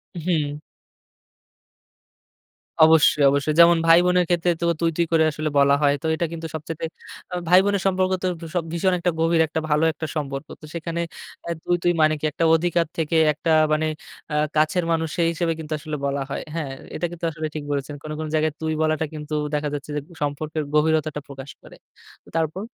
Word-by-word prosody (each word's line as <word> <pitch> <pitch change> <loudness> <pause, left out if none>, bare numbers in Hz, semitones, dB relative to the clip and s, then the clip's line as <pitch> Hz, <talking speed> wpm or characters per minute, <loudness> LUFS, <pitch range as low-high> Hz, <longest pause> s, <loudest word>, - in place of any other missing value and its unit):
উ - - -4
হুম। 150 -4 0 2.3
অবশ্যই, 155 -2 +5
অবশ্যই 140 +2 0
যেমন 170 0 +8
ভাই-বোনের 180 +1 +5
ক্ষেত্রে 175 0 +2
তো - - +1
তুই, 165 -1 +2
তুই 170 - +3
করে 160 -1 +4
আসলে 155 +1 -3
বলা 140 0 +5
হয়। 145 -1 +4
তো - - -7
এটা 170 - -1
কিন্তু 165 -1 -5
সবচাইতে 160 +1 -6 0.5
আ - - -1
ভাই-বোনের 190 +2 +4
সম্পর্ক 185 0 +1
তো - - +1
ভ - - -9 0.3
ভীষণ 180 +2 +1
একটা 175 0 +1
গভীর 165 0 +3
একটা 160 - -2
ভালো 150 +2 +2
একটা 160 - -5
সম্পর্ক। 140 0 -4
তো - - -10
সেখানে 170 +1 -3 0.4
অ্যা 170 - -4
তুই, 175 - +1
তুই 175 - +4
মানে 155 0 +4
কি? 155 - -3
একটা 165 - -2
অধিকার 170 0 +1
থেকে 165 0 -1 0.2
একটা 160 +2 -2 0.2
মানে 155 +1 +1 0.4
অ্যা 150 - -3 0.2
কাছের 155 +3 +2
মানুষ 160 0 +1
সেই 170 -1 +3
হিসেবে 165 0 -1
কিন্তু 155 0 -5
আসলে 155 0 -5
বলা 140 0 -1
হয়। - - -3
হ্যাঁ? 150 -5 -3 0.2
এটা 175 - -2
কিন্তু 170 -1 -5
আসলে 155 0 -4
ঠিক 150 - -4
বলেছেন। 140 +1 -3
কোনো, 155 0 -5
কোনো 155 -1 -4
জায়গায় 155 -1 +1
তুই 160 0 -1
বলাটা 155 0 +1
কিন্তু 150 0 -7 0.2
দেখা 150 0 0
যাচ্ছে 145 +1 -5
যে - - 0 0.2
সম্পর্কের 150 +2 -2
গভীরতাটা 155 -1 +1
প্রকাশ 135 0 -9
করে। - - -14 0.6
তারপর? 165 +6 -2
160 Hz, 185 wpm, -23 LUFS, 150-170 Hz, 2.3 s, যেমন